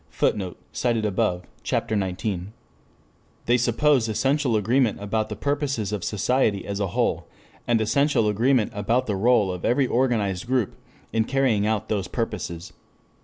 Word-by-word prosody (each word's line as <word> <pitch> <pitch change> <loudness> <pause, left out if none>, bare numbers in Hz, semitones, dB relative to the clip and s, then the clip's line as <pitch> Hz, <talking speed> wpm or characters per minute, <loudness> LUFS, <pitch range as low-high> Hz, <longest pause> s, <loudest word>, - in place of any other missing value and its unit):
[Footnote: 95 -4 -1 0.2
Cf. 115 -3 0
op. 90 0 0 0.2
cit., - - -1
Ch. 95 -4 -2
XIX.] 105 -6 0 1.1
They 120 - +3
suppose 120 +1 +2
essential 130 +2 +1
agreement 115 +2 +2
about 110 +2 -2
the - - -4
purposes 140 -7 -1
of 105 - -3
society 110 -1 +1
as 100 0 -4
a 100 - 0
whole, 85 - -1 0.4
and 115 -1 +3
essential 125 +1 +2
agreement 115 +2 +2
about 115 +5 0
the 105 - -1
role 105 -1 +3
of 90 -1 -6
every 130 +3 +2
organized 115 -6 0
group 125 -5 0 0.4
in 115 - +2
carrying 125 -6 +1
out 110 -1 -1
those 100 -3 -1
purposes. 90 -7 -4
110 Hz, 150 wpm, -24 LUFS, 100-125 Hz, 1.1 s, They